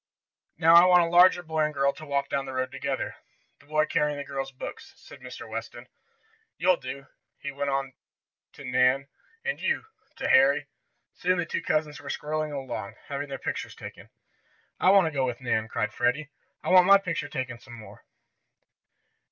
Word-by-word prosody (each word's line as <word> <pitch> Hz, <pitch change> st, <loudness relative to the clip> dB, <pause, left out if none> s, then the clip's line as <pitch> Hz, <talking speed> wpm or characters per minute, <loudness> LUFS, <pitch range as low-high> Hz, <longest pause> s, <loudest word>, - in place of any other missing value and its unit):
"Now 165 Hz, 0 st, +5 dB
I 170 Hz, +1 st, +9 dB
want 180 Hz, -1 st, +6 dB
a 165 Hz, -, -1 dB
larger 175 Hz, +1 st, +6 dB
boy 160 Hz, -1 st, -3 dB
and 150 Hz, -1 st, -1 dB
girl 140 Hz, 0 st, +2 dB
to 155 Hz, -, -11 dB
walk 140 Hz, -1 st, 0 dB
down 135 Hz, -1 st, -2 dB
the 130 Hz, -, -6 dB
road 130 Hz, 0 st, -2 dB
together, 135 Hz, 0 st, -3 dB, 0.4 s
the 145 Hz, -, -22 dB
boy 155 Hz, 0 st, +2 dB
carrying 150 Hz, -2 st, 0 dB
the 145 Hz, -, -4 dB
girl's 135 Hz, -1 st, -4 dB
books," 130 Hz, -, -9 dB
said -, -, -14 dB
Mr. 125 Hz, -2 st, -9 dB
Weston. 115 Hz, +2 st, -7 dB, 0.7 s
"You'll 180 Hz, +1 st, +3 dB
do," 135 Hz, +2 st, -7 dB, 0.3 s
he 145 Hz, -, -6 dB
went 140 Hz, 0 st, -3 dB
on 135 Hz, -1 st, -2 dB, 0.6 s
to 140 Hz, -, -11 dB
Nan, 130 Hz, +2 st, +2 dB, 0.4 s
"and -, -, -2 dB
you," -, -, 0 dB, 0.3 s
to -, -, -3 dB
Harry. 265 Hz, 0 st, +5 dB, 0.5 s
Soon 185 Hz, +1 st, 0 dB
the 175 Hz, -, -1 dB
two -, -, -3 dB
cousins 150 Hz, -2 st, -1 dB
were 140 Hz, -, -9 dB
strolling 155 Hz, +1 st, -3 dB
along, 135 Hz, -8 st, -5 dB
having 145 Hz, 0 st, -4 dB
their 135 Hz, -, -4 dB
pictures -, -, -5 dB
taken. -, -, -11 dB, 0.7 s
"I 185 Hz, -, +4 dB
want 195 Hz, -2 st, +6 dB
to 160 Hz, -, -1 dB
go 140 Hz, -3 st, 0 dB
with 120 Hz, -1 st, -4 dB
Nan!" 110 Hz, -3 st, -1 dB
cried 110 Hz, -1 st, -2 dB
Freddie 135 Hz, +6 st, 0 dB, 0.3 s
"I -, -, -3 dB
want 185 Hz, -1 st, +7 dB
my 200 Hz, 0 st, +9 dB
picture 180 Hz, -4 st, -4 dB
taken 130 Hz, -4 st, -4 dB
some 120 Hz, 0 st, -14 dB
more." 110 Hz, -3 st, -13 dB
140 Hz, 185 wpm, -27 LUFS, 130-160 Hz, 0.7 s, I